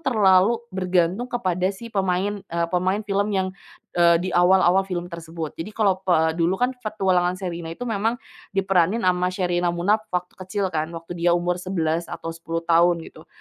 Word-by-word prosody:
terlalu 210 -2 +4
bergantung 185 +3 +1
kepada 185 -7 0
si 230 +4 -9
pemain, 195 +1 0
eee, 170 0 -1
pemain 185 +3 +1
film 200 0 0
yang, 190 0 0 0.5
eee, 170 -1 +6
di - - -2
awal-awal 180 +1 +5
film 175 -1 -3
tersebut. 165 -2 -6
Jadi 165 - -4
kalau 195 -4 +2
pe 160 -4 +2
dulu, 170 +2 +1
kan, 250 +1 +2
Petualangan 190 -6 0
Sherina 175 -3 -5
itu 245 - -6
memang 225 +2 0 0.4
diperanin 195 +2 +2
sama 180 0 +2
Sherina 175 -1 0
Munaf 205 +6 0
waktu 180 0 -3
kecil, 190 +1 -2
kan, 155 0 -1
waktu 165 +1 -8
dia 175 0 +3
umur 175 0 0
11 170 -3 -1
atau - - -6
10 165 0 -4
tahun 170 +1 +4
gitu, - - -14
180 Hz, 170 wpm, -23 LUFS, 170-195 Hz, 0.5 s, eee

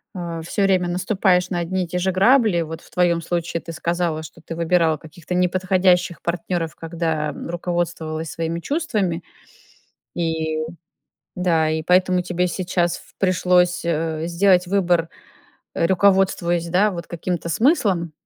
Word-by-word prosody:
а, 170 -2 -5
всё 200 +4 -1
время 185 -2 +2
наступаешь 180 0 +1
на 175 - 0
одни 185 +2 -1
и - - -12
те 180 - -3
же 190 +1 +1
грабли, 205 -1 +4
вот 160 0 -6
в - - -19
твоём 175 -2 +2
случае, 170 0 -2
ты 165 - -8
сказала, 170 -1 -1
что 170 +2 -12
ты 165 - -6
выбирала 165 -1 +2
каких-то 165 +3 -9
неподходящих 180 -1 +2
партнёров, 170 -2 -2
когда, 160 -2 -2
м, - - -8
руководствовалась 170 -3 -3
своими 165 +3 -3
чувствами, 205 - -1 0.9
и, 160 -2 -1 0.8
да, 165 -3 +2
и 160 0 -1
поэтому 180 +1 +3
тебе 180 0 -1
сейчас 175 -1 -1 0.2
пришлось, 180 -1 +2
э, 160 -1 -1
сделать 180 +1 +3
выбор, 175 -3 +1 0.7
э, 165 - +2
руководствуясь, 185 -2 +2
да, 195 +5 +3
вот 170 -2 -6
каким-то 170 0 -4
смыслом. 195 - +2
175 Hz, 140 wpm, -21 LUFS, 165-185 Hz, 0.9 s, грабли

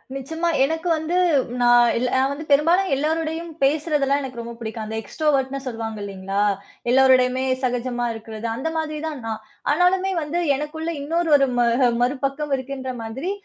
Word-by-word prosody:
நிச்சயமா 320 +6 -2
எனக்கு 320 +5 -1
வந்து 320 +3 -1 0.4
நா 245 - +3 0.3
இல்ல 250 +2 0
நான் 265 +1 +3
வ - - -1
ந்து 310 - -6
பெரும்பாலும் 335 +7 +4
எல்லாரோடையும் 320 +3 -2
பேசுறதுல்லாம் 285 -1 +2
எனக்கு 255 -3 -6
ரொம்ப 235 0 -7
புடிக்கும். 220 -1 -5
அந்த 220 +1 -5
எக்ஸ்ட்ரோவர்ட்ன்னு 275 +1 0
சொல்வாங்க 225 -2 -4
இல்லைங்களா! 195 0 -3 0.5
எல்லாரோடயுமே 255 0 +4 0.2
சகஜமா 245 -1 -1
இருக்கிறது 225 0 -7
அந்த 275 +7 -2
மாதிரி 310 -1 -2
தான் 300 -4 -5
நான். 220 -1 -4 0.3
ஆனாலுமே 365 +4 +2
வந்து 310 +3 -2 0.2
எனக்குள்ள 315 +3 -4
இன்னொரு 330 +3 0
ஒரு 275 -1 +3
ம - - +5 0.4
மறுபக்கம் 275 +3 -1
இருக்கின்ற 260 0 -5
மாதிரி 255 - -4
275 Hz, 150 wpm, -22 LUFS, 245-315 Hz, 0.5 s, ம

